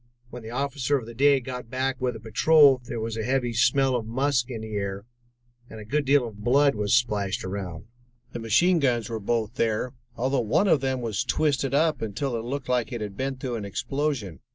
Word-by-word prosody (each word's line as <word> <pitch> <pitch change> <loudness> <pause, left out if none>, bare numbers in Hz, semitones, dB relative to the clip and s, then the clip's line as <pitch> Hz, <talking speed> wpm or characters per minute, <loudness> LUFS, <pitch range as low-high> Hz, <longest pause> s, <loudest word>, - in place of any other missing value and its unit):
When 125 - -8
the 110 - -9
officer 140 +2 -1
of 125 - -6
the 115 - -9
day 140 +3 +4
got 125 -2 -7
back 130 +1 -2
with 125 -2 -1
a - - -7
patrol, 135 +4 +5
there 120 -1 -5
was 110 0 -3
a 110 - -2
heavy 125 0 0
smell 130 +3 +3
of 115 -3 -3
musk 130 +1 0
in 115 -4 -5
the 110 -1 -7
air, 100 0 -3 0.6
and 110 - -9
a 105 - -9
good 145 +6 0
deal 135 -2 +3
of 105 -2 -11
blood 140 +4 +4
was 105 0 +1
splashed 105 -3 0
around. 95 -4 -5 0.5
The - - -6
machine 170 - +3
guns 120 -6 +1
were 110 - -3
both 110 +1 -2
there, 115 +3 0 0.2
although 130 +2 0
one 115 - +2
of 155 -7 +4
them 130 -1 -1
was 110 -4 -1
twisted 140 -3 0
up 155 +2 +2
until 115 +5 -2
it 115 - -3
looked 135 +3 -4
like 125 -1 0
it 120 -3 -4
had 105 -2 -5
been 135 +4 -2
through 130 -2 -4
an 105 - -5
explosion. 120 - -3
120 Hz, 220 wpm, -26 LUFS, 110-135 Hz, 0.6 s, patrol